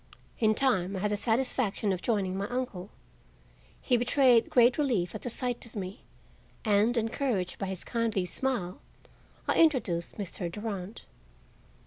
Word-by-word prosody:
In 215 -3 +3
time 195 -8 +1
I - - -2
had 210 0 0
the - - +2
satisfaction 225 -2 0
of 180 - -4
joining 200 -5 0
my 195 +1 -2
uncle. 230 -7 -4 0.9
He 250 - +3
betrayed 245 -1 +4
great 245 +2 +4
relief 235 -12 +1
at 215 - -6
the 245 - -4
sight 245 0 -3
of 230 - -19
me, 190 -1 -5 0.6
and, 215 +3 +3
encouraged 225 -5 -1
by 195 - -2
his 190 -2 -4
kindly 230 -5 -1
smile, 185 -2 -2 0.7
I - - +2
introduced 225 - +1
Mr. 185 -3 -4
Durand. 205 0 -5
215 Hz, 145 wpm, -29 LUFS, 190-245 Hz, 0.9 s, betrayed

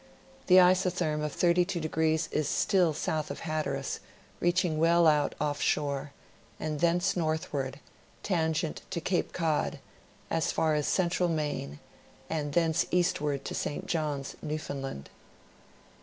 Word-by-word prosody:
The 180 - +6
isotherm 180 -4 +3
of 150 - -3
32° 170 -3 +1
is 150 -1 0
still 180 -4 +3
south 155 0 -2
of - - -6
Hatteras, 155 -1 -2 0.4
reaching 175 -2 +1
well 170 +1 +5
out 150 -2 +3
off 145 -1 -1
shore, 140 -1 0 0.5
and 155 -1 -3
thence 175 +4 +2
northward, 155 -5 -2 0.4
tangent 160 -3 0
to 180 - -2
Cape 180 +2 -1
Cod, 160 -3 0 0.5
as 165 -1 +1
far 160 -1 +1
as 150 -1 0
central 180 -1 +1
Maine, 145 - -2 0.5
and 150 -3 -2
thence 165 -1 +2
eastward 150 -6 0
to - - -4
St. 165 +5 -3
Johns, 150 -6 -2
Newfoundland. 140 - -5
160 Hz, 125 wpm, -29 LUFS, 150-175 Hz, 0.5 s, The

